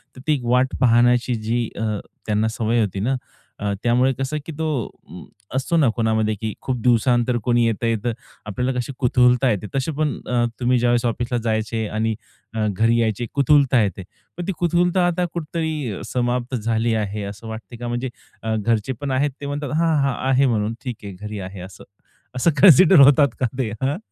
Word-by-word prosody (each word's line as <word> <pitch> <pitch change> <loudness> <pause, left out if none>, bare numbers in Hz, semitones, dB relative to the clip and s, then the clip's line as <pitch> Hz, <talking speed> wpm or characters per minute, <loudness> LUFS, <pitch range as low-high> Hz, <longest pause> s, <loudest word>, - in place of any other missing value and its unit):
तर 130 - -11
ती 155 - +4
एक 135 -4 -2
वाट 125 +2 +2
पाहण्याची 120 0 +4
जी 115 0 0
अ, 110 -1 -2 0.3
त्यांना 105 +1 +1
सवय 115 +1 +1
होती 100 -2 -2
ना, 125 +7 0 0.4
अ, 100 -1 -1
त्यामुळे 125 +2 +3
कसं 135 +4 -3
की - - -6
तो 160 - -2 0.4
अं, 85 +3 -10 0.3
असतो 150 +6 0
ना 150 -5 +4
कोणामध्ये 110 -2 +1
की 110 -1 -2
खूप 130 -1 -2
दिवसानंतर 120 +1 +2
कोणी 120 0 +2
येतंय, 115 +1 0
तर 120 -1 0 0.3
आपल्याला 125 +5 -2
कशी 125 - -4
कुतूहलता 125 0 +3
येते. 105 0 -3
तशी 135 +3 0
पण 155 -1 +1
अ, 120 -1 +1 0.2
तुम्ही 125 0 +2
ज्यावेळेस 120 0 +2
ऑफिसला 120 +1 -1
जायचे 110 0 -1
आणि 110 0 0 0.4
अ, 110 -1 -1
घरी 115 +1 +3
यायचे 110 +1 -1
कुतूहलता 140 -3 +4
येते. 100 -1 -3 0.3
पण 175 - -5
ती - - +1
कुतूहलता 175 +1 +2
आता 175 +1 0
कुठेतरी 155 - -3
समाप्त 125 +1 -1
झाली 115 0 0
आहे 105 -1 -2
असं 105 +3 -11
वाटते 110 +2 -8
का? 120 +1 -6
म्हणजे 120 +2 -2 0.3
अ, 110 0 -1
घरचे 110 +3 0
पण 140 -1 -2
आहेत 140 +2 +1
ते - - -5
म्हणतात, 145 0 -4
"हां, 165 -1 +2
हां,"आहे 135 0 +1
म्हणून. 110 -3 0
"ठीक 125 -3 -4
आहे, 100 -1 -7
घरी 105 +3 -7
आहे" 95 0 -7
असं, 95 - -14 0.5
असं 130 +7 +2
कान्सिडर 180 0 +8
होतात 140 +1 +7
का 130 - +1
ते? 115 -5 -1
हां. 135 +3 0
120 Hz, 185 wpm, -21 LUFS, 110-135 Hz, 0.5 s, कान्सिडर